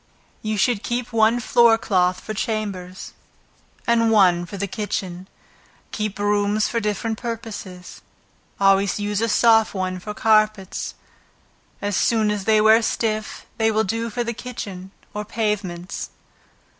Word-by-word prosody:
You 215 Hz, 0 st, -2 dB
should 210 Hz, +1 st, +2 dB
keep 240 Hz, 0 st, -3 dB
one 225 Hz, +1 st, +4 dB
floor 235 Hz, -1 st, +4 dB
cloth 185 Hz, -4 st, +1 dB
for 215 Hz, -, -5 dB
chambers, 195 Hz, -4 st, -4 dB, 0.7 s
and 230 Hz, -1 st, +3 dB
one 180 Hz, -5 st, +4 dB
for 200 Hz, -, -7 dB
the 200 Hz, -, -1 dB
kitchen. 190 Hz, -3 st, -4 dB, 0.6 s
Keep 215 Hz, -1 st, -3 dB
brooms 205 Hz, +1 st, +1 dB
for 230 Hz, -, -1 dB
different 215 Hz, +1 st, -2 dB
purposes; 220 Hz, -6 st, -7 dB, 0.6 s
always 195 Hz, 0 st, +3 dB
use 205 Hz, 0 st, -1 dB
a 230 Hz, -, +1 dB
soft 225 Hz, -1 st, +4 dB
one 185 Hz, -1 st, -2 dB
for 210 Hz, +3 st, -7 dB
carpets, 215 Hz, -3 st, +1 dB, 0.9 s
as 205 Hz, -1 st, -1 dB
soon 220 Hz, 0 st, +2 dB
as 205 Hz, -2 st, -3 dB
they 220 Hz, -1 st, +4 dB
wear 220 Hz, +2 st, +6 dB
stiff, 215 Hz, -1 st, -2 dB
they 220 Hz, 0 st, +3 dB
will 220 Hz, 0 st, +2 dB
do 225 Hz, +4 st, -2 dB
for 240 Hz, +2 st, -2 dB
the 235 Hz, 0 st, -3 dB
kitchen, 200 Hz, -6 st, -7 dB, 0.2 s
or 210 Hz, -, -3 dB
pavements. 205 Hz, -5 st, -3 dB
210 Hz, 140 wpm, -22 LUFS, 195-225 Hz, 0.9 s, wear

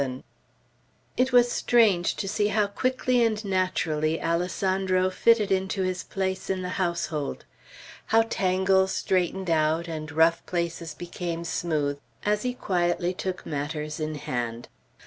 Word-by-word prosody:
VII 130 Hz, -1 st, -3 dB, 0.9 s
IT 255 Hz, +1 st, +2 dB
was 245 Hz, -1 st, +5 dB
strange 210 Hz, -10 st, +3 dB
to 195 Hz, -, -4 dB
see 205 Hz, +1 st, +1 dB
how 210 Hz, 0 st, +2 dB
quickly 255 Hz, +3 st, +1 dB
and 220 Hz, -1 st, 0 dB
naturally 165 Hz, -5 st, 0 dB
Alessandro 185 Hz, +2 st, 0 dB
fitted 215 Hz, 0 st, +3 dB
into 190 Hz, 0 st, 0 dB
his 185 Hz, 0 st, -1 dB
place 190 Hz, -1 st, -3 dB
in 190 Hz, -1 st, -1 dB
the 180 Hz, -, -3 dB
household. 170 Hz, -4 st, -2 dB, 0.6 s
How 225 Hz, 0 st, +5 dB
tangles 190 Hz, -2 st, +2 dB
straightened 185 Hz, 0 st, 0 dB
out, 160 Hz, +1 st, +2 dB
and 155 Hz, -2 st, -5 dB
rough 160 Hz, +1 st, +3 dB
places 170 Hz, -2 st, -3 dB
became 170 Hz, 0 st, -5 dB
smooth, 150 Hz, -4 st, -1 dB, 0.3 s
as 210 Hz, 0 st, +2 dB
he 250 Hz, +1 st, -2 dB
quietly 175 Hz, -3 st, 0 dB
took 185 Hz, 0 st, -4 dB
matters 150 Hz, +1 st, -4 dB
in 155 Hz, 0 st, -3 dB
hand. 120 Hz, -4 st, -4 dB
185 Hz, 135 wpm, -26 LUFS, 160-195 Hz, 0.9 s, was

